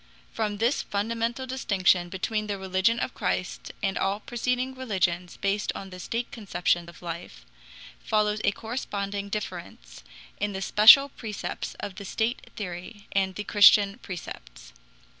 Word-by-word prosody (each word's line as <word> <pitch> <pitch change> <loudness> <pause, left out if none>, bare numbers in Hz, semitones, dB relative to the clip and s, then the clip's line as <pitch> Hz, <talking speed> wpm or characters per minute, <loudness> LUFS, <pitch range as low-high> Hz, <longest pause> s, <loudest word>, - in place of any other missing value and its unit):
From 210 -2 -1
this 235 +6 +1
fundamental 230 +5 -2
distinction 190 -8 +2
between 215 +3 -2
the 205 -1 -2
religion 190 +4 +1
of 255 - -2
Christ 180 -2 -2
and 195 -1 0
all 195 +2 0
preceding 250 +3 -2
religions 180 -8 -1
based 200 +1 0
on 195 -1 -7
the 185 - -9
state 230 +6 -3
conception 175 -5 -1
of 170 - -15
life, 160 - -7 0.6
follows 210 0 +1
a - - +4
corresponding 200 -3 -4
difference 170 - -6 0.4
in 205 0 -1
the 190 - -4
special 225 +9 +8
precepts 220 -6 -5
of 200 -2 -6
the 200 - -7
state 225 +5 -2
theory 190 +1 -7
and 190 -1 +1
the 210 - -4
Christian 205 +1 +6
precepts. - - -9
200 Hz, 140 wpm, -27 LUFS, 185-225 Hz, 0.6 s, special